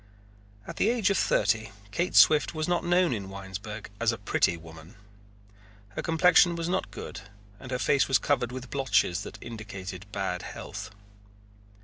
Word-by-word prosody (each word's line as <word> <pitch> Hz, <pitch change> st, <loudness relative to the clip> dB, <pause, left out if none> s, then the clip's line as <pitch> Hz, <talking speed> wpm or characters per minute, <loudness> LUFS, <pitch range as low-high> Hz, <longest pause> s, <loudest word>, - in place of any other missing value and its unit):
At -, -, -8 dB
the 215 Hz, -, +3 dB
age 230 Hz, -4 st, +2 dB
of 195 Hz, -, +1 dB
thirty 110 Hz, +1 st, +1 dB, 0.2 s
Kate 175 Hz, -, -1 dB
Swift 155 Hz, +1 st, +6 dB
was 155 Hz, 0 st, -1 dB
not 175 Hz, -1 st, +1 dB
known 175 Hz, -3 st, +3 dB
in 100 Hz, -4 st, -5 dB
Winesburg 100 Hz, +2 st, -7 dB
as -, -, +3 dB
a -, -, -4 dB
pretty 85 Hz, -, +1 dB
woman. 80 Hz, +4 st, -13 dB, 0.9 s
Her 100 Hz, -, -5 dB
complexion 175 Hz, +1 st, +5 dB
was 170 Hz, 0 st, -3 dB
not 185 Hz, +2 st, -1 dB
good -, -, -8 dB, 0.4 s
and 130 Hz, -, -10 dB
her 125 Hz, -, -1 dB
face 140 Hz, +2 st, +2 dB
was 135 Hz, -, +4 dB
covered 130 Hz, -5 st, 0 dB
with 130 Hz, 0 st, -8 dB
blotches 105 Hz, -9 st, +1 dB
that -, -, -8 dB
indicated 100 Hz, -5 st, -8 dB
ill 95 Hz, -3 st, -2 dB
health. 100 Hz, +3 st, -7 dB
115 Hz, 160 wpm, -28 LUFS, 100-165 Hz, 0.9 s, Swift